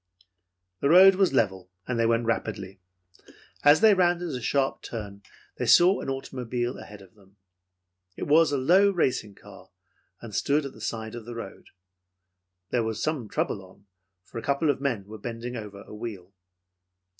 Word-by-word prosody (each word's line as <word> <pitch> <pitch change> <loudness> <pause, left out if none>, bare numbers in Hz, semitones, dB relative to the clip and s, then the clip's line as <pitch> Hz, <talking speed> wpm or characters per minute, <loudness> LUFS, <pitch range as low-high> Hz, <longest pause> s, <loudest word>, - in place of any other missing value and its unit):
The 140 - +1
road 190 +4 +8
was 190 0 +2
level, 95 -8 0 0.2
and 125 -2 -2
they 115 - +3
went 115 0 +1
rapidly. 100 -4 -3 0.8
As 145 +4 +6
they 220 -1 +7
rounded 175 -2 +1
a 125 -4 -4
sharp 135 +3 0
turn, 100 -3 -7 0.4
they - - -2
saw 180 +3 +6
an - - -5
automobile 125 -2 -4
ahead 105 -1 -12
of 95 - -20
them. 100 -1 -24 0.8
It - - -5
was 155 +2 +4
a 140 - +1
low 180 +10 +4
racing 130 - -1
car - - -15 0.5
and 115 -3 -10
stood 145 +7 +1
at 140 - -7
the 110 - -15
side 110 0 -4
of 120 -2 -8
the 120 - -7
road. 115 -4 -9 1.0
There 120 - +1
was 110 -1 -3
some 140 -8 -2
trouble 95 - -2
on, 95 +2 -19 0.4
for 115 - -8
a - - -7
couple 140 +4 +1
of 135 - -6
men 120 -8 -2
were 110 +2 -10
bending 120 +3 -6
over 105 -3 -8
a - - -13
wheel. 105 -4 -8
120 Hz, 175 wpm, -26 LUFS, 105-145 Hz, 1.0 s, road